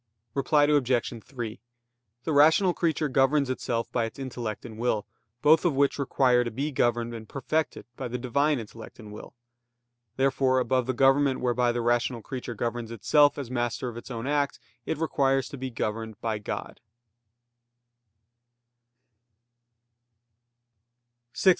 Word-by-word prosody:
Reply 145 +2 +3
Obj. 130 -6 +1
3: 120 -4 -6 0.6
The 160 - -1
rational 160 +6 +5
creature 160 -3 0
governs 135 0 +2
itself 115 -2 -2
by 115 -2 +1
its 115 - -8
intellect 120 -5 -5
and 110 -2 -9
will, 110 -4 0 0.4
both 155 +2 +6
of 170 -6 +1
which 140 +1 +2
require 125 -2 +3
to 120 - -3
be 140 +7 -3
governed 120 -2 0
and 110 -2 -8
perfected 155 +4 -2
by 130 - -4
the 125 +1 -3
Divine 140 +4 +1
intellect 115 0 -9
and 110 -3 -11
will. 105 - -10 0.8
Therefore 135 -1 +2
above 130 -1 +1
the 130 - 0
government 135 +1 +4
whereby 125 -1 +1
the 120 0 -2
rational 120 -1 0
creature 125 -1 -6
governs 115 +1 -3
itself 145 +6 +3
as 135 -4 -5
master 120 0 -2
of 115 - -9
its 120 - -9
own 115 -2 -5
act, 145 0 0 0.3
it - - -1
requires 135 -4 +1
to - - -7
be 130 0 -3
governed 110 -2 -4
by 110 -2 -2
God. 105 - -6
125 Hz, 140 wpm, -27 LUFS, 115-140 Hz, 0.8 s, both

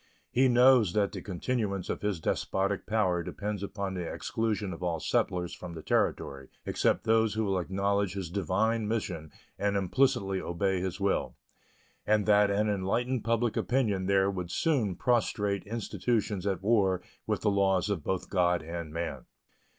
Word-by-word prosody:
He 130 +2 +4
knows 125 -5 +5
that 100 -2 +2
the - - -6
continuance 100 0 -2
of - - -3
his 105 -4 -1
despotic 95 +4 -1
power 95 -5 +1
depends 105 +3 -4
upon 100 -1 -4
the 90 -3 -4
exclusion 105 -4 -2
of 85 - -9
all 85 -2 -1
settlers 90 +2 0
from 90 -2 -8
the 80 - -8
Territory 70 -1 -1 0.2
except - - +1
those 110 -1 +2
who 110 - +1
will 95 -2 +1
acknowledge 100 +1 0
his 95 -4 -4
divine 105 +4 0
mission 90 -8 -3 0.3
and 100 0 +1
implicitly 100 -1 +1
obey 95 +2 -1
his 95 0 -3
will, 100 0 0 0.7
and 105 -1 +2
that 105 -1 +5
an 105 +2 +1
enlightened 110 +5 0
public 115 0 +1
opinion 105 -8 0
there 100 0 +3
would 90 -3 -4
soon 115 - +1
prostrate 105 -3 +1
institutions 110 -2 -1
at 95 -1 -1
war 95 -4 +2 0.2
with - - 0
the 105 - +2
laws 95 -2 +2 0.2
both 95 -1 -1
of - - -15
God 90 -3 +2
and 85 -1 -6
man. 85 +1 -4
100 Hz, 160 wpm, -29 LUFS, 90-110 Hz, 0.7 s, knows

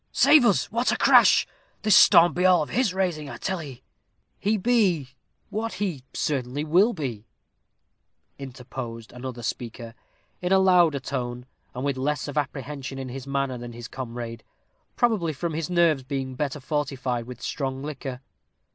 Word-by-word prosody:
Save 300 -5 +6
us! 205 - +2
what 235 +3 +1
a - - 0
crash! - - +6 0.4
this 215 -2 +5
storm 170 +1 +7
be 180 - -1
all 180 -3 +5
of - - -9
his 245 -5 +1
raising, 175 -6 -2
I - - -7
tell 190 -3 -3
'ee." 130 -5 -10 0.6
"He 215 +2 +1
be 190 - +2 0.4
what 225 +2 -3
he 180 -10 -3
certainly 140 0 -2
will 180 +9 +4
be," 125 - -5 1.1
interposed 125 -3 -8
another 125 -1 -7
speaker, 115 0 -5 0.5
in 180 +1 -2
a 190 - +6
louder 180 -6 +4
tone, 125 -2 -4 0.3
and 125 +2 -3
with 140 -2 -1
less 145 +3 -1
of 145 - -6
apprehension 140 -1 -4
in 130 -1 -5
his 135 +2 -7
manner 140 -2 -2
than 120 0 -8
his 120 0 -8
comrade, 120 -3 -7 0.5
probably 210 -10 +1
from 165 +4 -3
his 160 +1 -3
nerves 170 -5 +3
being 130 0 -4
better 145 +2 -3
fortified 130 -4 -2
with 125 - -9
strong 135 -1 -4
liquor. 135 -3 -6
140 Hz, 160 wpm, -25 LUFS, 130-175 Hz, 1.1 s, storm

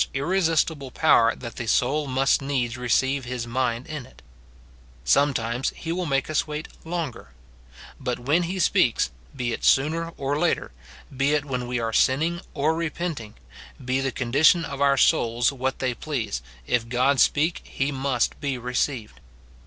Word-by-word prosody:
289 135 +2 -1
irresistible 165 -6 +1
power 120 -5 +4
that 120 -2 -9
the 120 - -4
soul 140 +6 +1
must 135 +2 +2
needs 130 -4 -1
receive 130 +2 +1
his 120 -1 -4
mind 120 0 -1
in 155 -4 -6
it; 70 - -20 0.8
sometimes 125 - +1
he 165 - -5
will 180 +1 -2
make 135 -2 0
us 155 +1 0
wait 150 +1 -5 0.2
longer: 160 - -4 0.7
but 125 -2 -2
when 145 +8 +1
he 175 +2 -3
speaks, 165 - +2 0.2
be 120 -3 -2
it - - -6
sooner 160 +5 +3
or 140 +2 -1
later, 175 - 0 0.4
be 140 +3 +2
it 145 -1 -1
when 125 -3 -3
we 120 0 -1
are 115 -1 -2
sinning 160 +9 +2
or 155 +2 +2
repenting, 165 -8 -4 0.5
be 130 +1 +1
the 135 -1 -1
condition 145 +8 +3
of 140 0 -6
our 140 -1 +4
souls 120 -1 +3
what 130 -1 -2
they 130 -2 -1
please, 115 - -3 0.2
if 115 - 0
God 130 +3 +2
speak, 160 +4 +2
he 135 +2 -2
must 135 -3 -1
be 140 -3 -1
re 125 +1 -6
ceived. 120 - -2
135 Hz, 165 wpm, -24 LUFS, 125-150 Hz, 0.8 s, power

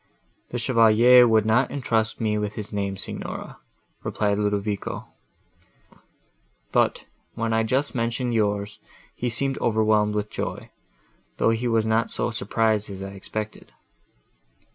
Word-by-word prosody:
"The 120 - -3
Chevalier 120 +1 +6
would 110 -2 +3
not 120 +4 +3
entrust 115 -5 -1
me 110 -2 0
with 105 0 -3
his 105 -1 -6
name, 100 -1 -2
Signora," - - -6 0.4
replied 105 -1 0
Ludovico; 105 -1 -2 1.6
"but, - - +1 0.3
when 115 0 -1
I 110 - +3
just 130 +6 0
mentioned 120 +1 -1
yours, 105 -2 -1 0.3
he 125 - -2
seemed 135 +4 -1
overwhelmed 110 -2 +2
with 105 0 -2
joy, - - -5 0.7
though 115 - +3
he 115 +2 -1
was 115 -2 +2
not 110 +1 +1
so - - -2
much - - -3
surprised 110 -2 0
as 95 -1 -7
I 100 - -5
expected." 105 +2 -6
110 Hz, 135 wpm, -24 LUFS, 105-115 Hz, 1.6 s, Chevalier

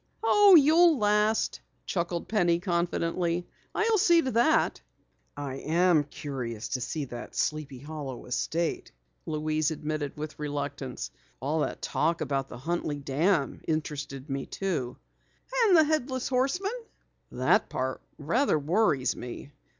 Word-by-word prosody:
"Oh, 410 -3 +7
you'll 320 +2 +6
last," 210 0 +1 0.2
chuckled 170 -1 -2
Penny 175 -6 +2
confidently. 175 -1 -1 0.3
"I'll 440 0 +2
see 345 -2 +5
to 260 - -1
that." 315 +8 +2 0.6
"I 140 -2 -4
am 165 +1 +3
curious 130 -7 -5
to 125 - -2
see 145 +3 -3 0.3
Sleepy 150 -3 -2
Hollow 140 -2 -7
estate," 160 +6 -2 0.4
Louise 155 -1 0
admitted 150 -2 -4
with 155 0 -6
reluctance. 140 - -4 0.3
"All 145 +5 -1
that - - -2
talk 165 +1 0
about 135 -1 -1
the - - -8
Huntley 155 +1 -2
Dam 145 +3 0
interested 145 -3 -3
me 135 -1 -3
too." 150 -11 -3 0.7
"And 370 -4 +6
the 320 - +7
Headless 275 -4 -1
Horseman?" 275 - 0 0.6
"That - - +2
part 130 0 -3 0.2
rather 170 - +1
worries 150 - +1
me. 125 +3 -8
155 Hz, 125 wpm, -28 LUFS, 140-210 Hz, 0.7 s, Oh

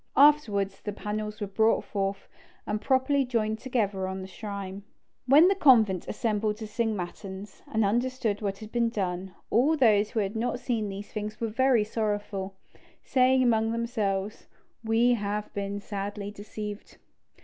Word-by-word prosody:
Afterwards 210 -10 +4
the 210 - -4
panels 210 +1 -4
were 205 - -2
brought 220 +3 +2
forth, 195 -1 -3 0.4
and 210 0 -2
properly 270 +3 +2
joined 220 -3 -1
together 205 -7 -1
on 190 0 -4
the - - -7
shrine. 200 -1 -6 0.5
When 295 +7 +7
the 390 - +4
convent 225 - +4
assembled 215 -2 -1
to 220 - -6
sing 220 0 -1
matins, 190 +2 -7
and 220 -1 +2
understood 235 -1 0
what 200 -2 -2
had 215 +1 -10
been 235 -1 +1
done, 190 -3 -3 0.2
all 290 +7 +3
who 215 -4 +3
had 200 +1 -1
not 245 +2 -1
seen 225 -5 -1
these 200 +1 -7
things 215 0 -5
were 230 - -1
very 250 0 +3
sorrowful, 205 -3 -3 0.5
saying 260 0 +3
among 225 -2 +2
themselves, 210 -4 -2 0.4
"We 225 +2 +3
have 210 -1 -3
been 200 0 -3
sadly 205 0 -5
deceived." 210 0 -8
215 Hz, 150 wpm, -28 LUFS, 200-235 Hz, 0.5 s, When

